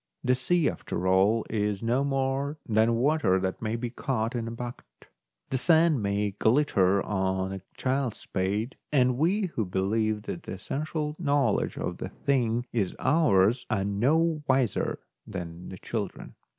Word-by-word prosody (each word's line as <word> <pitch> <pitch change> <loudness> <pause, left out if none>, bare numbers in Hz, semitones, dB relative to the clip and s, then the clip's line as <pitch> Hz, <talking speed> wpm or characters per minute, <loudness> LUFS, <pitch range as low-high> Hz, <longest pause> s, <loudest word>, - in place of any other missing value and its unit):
The 125 - +3
sea, 150 +7 +1
after 90 - -3
all, 100 +5 +3
is 105 -1 -1
no 120 +4 +2
more 135 +1 -1
than 110 +1 +3
water 130 -6 +2
that 95 0 -3
may 110 0 -1
be 120 0 -3
caught 120 -2 -2
in 115 -2 -3
a - - -4
bucket; 120 - -7 0.6
the 130 - +1
sand 160 -3 +4
may 100 0 0
glitter 100 -4 +2
on 95 -1 -1
a 95 - -6 0.2
child's 130 -3 -1
spade, 100 +6 -2
and 125 -3 +3
we 185 +3 +1
who 110 - 0
believe 105 +3 0
that - - -5
the - - -7
essential 150 +1 -3
knowledge 140 - +1
of - - -3
the - - -4
thing 120 -4 0
is 100 -6 0
ours 125 - +3
are 95 - 0
no 150 +11 +2
wiser 130 -5 +1 0.3
than 85 -2 -7
the 95 - -8
children. 105 0 -5
115 Hz, 155 wpm, -27 LUFS, 100-140 Hz, 0.6 s, sand